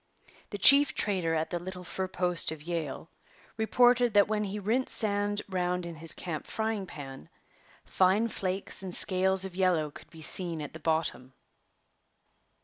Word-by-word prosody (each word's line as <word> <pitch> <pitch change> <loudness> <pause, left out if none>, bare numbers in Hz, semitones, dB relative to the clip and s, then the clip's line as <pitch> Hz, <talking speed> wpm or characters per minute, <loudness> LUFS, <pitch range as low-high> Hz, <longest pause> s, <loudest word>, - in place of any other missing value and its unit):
The 205 - -5
chief 275 +6 +6
trader 180 -5 -1
at 160 0 -2
the 175 - -2
little 180 +1 -8
fur 185 +2 -4
post 180 -3 0
of 155 -2 -8
Yale 165 -3 -5 0.5
reported 245 +1 +3
that 205 -1 +5
when 210 0 -1
he 200 +1 -5
rinsed 225 +6 0
sand 205 -1 +1
round 180 -2 -2
in 170 - -6
his 160 0 0
camp 165 -4 -6
frying 220 -3 -3
pan, 135 -5 -10 0.6
fine 190 +5 +2
flakes 190 -3 -3
and 185 -2 -1
scales 190 0 +4
of 190 -2 -8
yellow 175 -5 +1
could - - -14
be 160 -1 -11
seen 170 -1 -1
at 145 -2 -7
the 160 - -9
bottom. 155 -5 -2
185 Hz, 160 wpm, -29 LUFS, 165-205 Hz, 0.6 s, chief